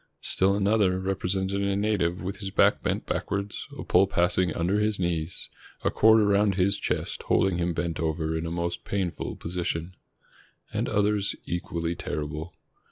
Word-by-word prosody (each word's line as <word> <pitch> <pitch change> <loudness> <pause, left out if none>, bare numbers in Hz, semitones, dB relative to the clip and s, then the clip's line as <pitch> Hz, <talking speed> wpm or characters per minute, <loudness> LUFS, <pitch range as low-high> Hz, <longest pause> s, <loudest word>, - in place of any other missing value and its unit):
Still 95 +1 +3
another 100 -2 +2
represented 95 +1 -1
a 100 0 +1
native 100 -5 0
with 100 +2 -4
his 100 -1 -4
back - - +3
bent - - -1
backward, 100 +1 -2 0.2
a - - -5
pole 95 +2 +4
passing 90 -1 +2
under 90 +5 +1
his 105 -1 +1
knees, 85 -1 -1 0.4
a - - +2
cord 110 0 +6
around 100 -1 +3
his 100 +2 +2
chest - - -2
holding 95 -2 +3
him 85 0 0
bent 85 -1 -2
over 80 0 -1
in 80 +1 -2
a - - -3
most 85 +1 -3
painful 95 -4 -3
position. 85 0 -3 0.8
And - - -1
others 105 -1 +1
equally 85 -1 -2
terrible. 75 0 -5
95 Hz, 160 wpm, -27 LUFS, 85-100 Hz, 0.8 s, cord